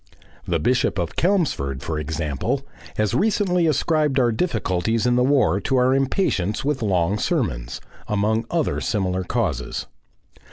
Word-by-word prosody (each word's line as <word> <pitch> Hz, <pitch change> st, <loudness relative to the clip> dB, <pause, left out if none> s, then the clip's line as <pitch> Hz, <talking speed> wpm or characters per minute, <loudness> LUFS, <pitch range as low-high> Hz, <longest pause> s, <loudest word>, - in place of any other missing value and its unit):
The 85 Hz, -, +1 dB
Bishop 125 Hz, +3 st, +1 dB
of 85 Hz, -3 st, -2 dB
Chelmsford, 140 Hz, -, 0 dB
for 80 Hz, -2 st, -3 dB
example, 75 Hz, -, -2 dB, 0.3 s
has 105 Hz, 0 st, +1 dB
recently 180 Hz, -, +2 dB
ascribed 150 Hz, -1 st, +1 dB
our 120 Hz, -2 st, +3 dB
difficulties 110 Hz, -, 0 dB
in 120 Hz, 0 st, +3 dB
the 125 Hz, -, +3 dB
war 125 Hz, -, +3 dB
to 130 Hz, -, 0 dB
our 125 Hz, +1 st, +4 dB
impatience 135 Hz, -, 0 dB
with 145 Hz, -3 st, 0 dB
long 95 Hz, -1 st, +1 dB
sermons -, -, -1 dB, 0.3 s
among 110 Hz, +2 st, 0 dB
other 165 Hz, -4 st, 0 dB
similar 95 Hz, -3 st, -1 dB
causes. 90 Hz, -, -2 dB
110 Hz, 135 wpm, -22 LUFS, 90-140 Hz, 0.3 s, our